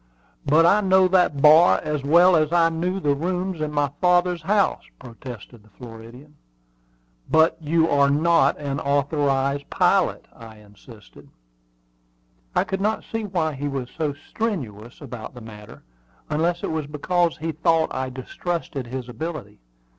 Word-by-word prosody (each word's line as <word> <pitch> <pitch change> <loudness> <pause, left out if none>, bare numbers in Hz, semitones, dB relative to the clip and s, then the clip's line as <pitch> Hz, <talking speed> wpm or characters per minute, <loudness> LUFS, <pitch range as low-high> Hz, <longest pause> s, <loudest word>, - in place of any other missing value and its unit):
"But 155 +4 +4
I 205 +5 +4
know 190 -1 +4
that 175 -7 +2
bar 155 +3 +7
as 150 -2 -3
well 170 +5 +5
as 155 -1 +1
I 170 -1 +3
knew 180 +4 -2
the 145 -5 +1
rooms 180 +3 -3
in 155 -1 -2
my 145 -2 0
father's 180 -1 +2
house," 200 +4 +1 0.2
protested 120 -2 -11
the 110 - -23
Floridian. 120 +6 -13 0.9
"But 160 +1 +4
you 160 +1 +1
are 140 -2 +3
not 165 +4 +2
an 140 -1 -4
authorized 140 -1 0
pilot," - - +1
I 110 -1 -13
insisted. 105 +1 -17 1.3
I - - +3
could 195 0 -4
not 215 +2 -1
see 225 -1 -3
why 170 -6 -1
he 145 +1 -4
was 135 -3 -5
so 150 -3 -2
strenuous 125 - -5
about 120 0 -9
the 125 - -10
matter, 105 -2 -13 0.5
unless 170 +3 0
it - - -2
was 160 -2 -3
because 170 +3 -1
he 160 +1 -3
thought 160 +1 +1
I 130 0 -3
distrusted 135 +1 -5
his 130 0 -6
ability. 125 - -7
150 Hz, 150 wpm, -22 LUFS, 130-170 Hz, 1.3 s, bar